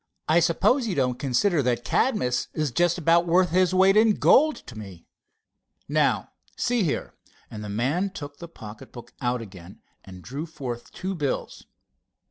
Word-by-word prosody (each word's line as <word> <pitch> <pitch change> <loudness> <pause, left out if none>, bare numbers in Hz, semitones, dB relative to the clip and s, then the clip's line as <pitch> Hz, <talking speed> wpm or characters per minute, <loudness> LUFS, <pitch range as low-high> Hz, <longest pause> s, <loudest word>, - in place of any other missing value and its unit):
"I 160 +2 +4
suppose 205 - +2
you 190 - -2
don't 125 -2 0
consider 145 +6 +1
that 120 -2 0
Cadmus 165 - 0
is 155 -4 -1
just 175 +7 +2
about 170 +1 +3
worth 180 +1 +3
his 185 +1 +3
weight 190 +1 +4
in 215 -1 +5
gold 305 +2 +4
to 120 - -11
me. 95 -6 -10 0.8
Now, - - +1 0.3
see 245 -1 +1
here," 165 -7 -2 0.4
and 105 -1 -7
the 105 - -6
man 135 - 0
took 145 -6 -9
the 170 - -8
pocket 110 -9 -12
book 120 - -12
out 120 -1 -1
again 95 -3 -13 0.2
and 95 -2 -12
drew 140 +7 -6
forth 130 -7 -7
two 190 +1 -4
bills. 145 -7 -4
150 Hz, 165 wpm, -25 LUFS, 120-185 Hz, 0.8 s, in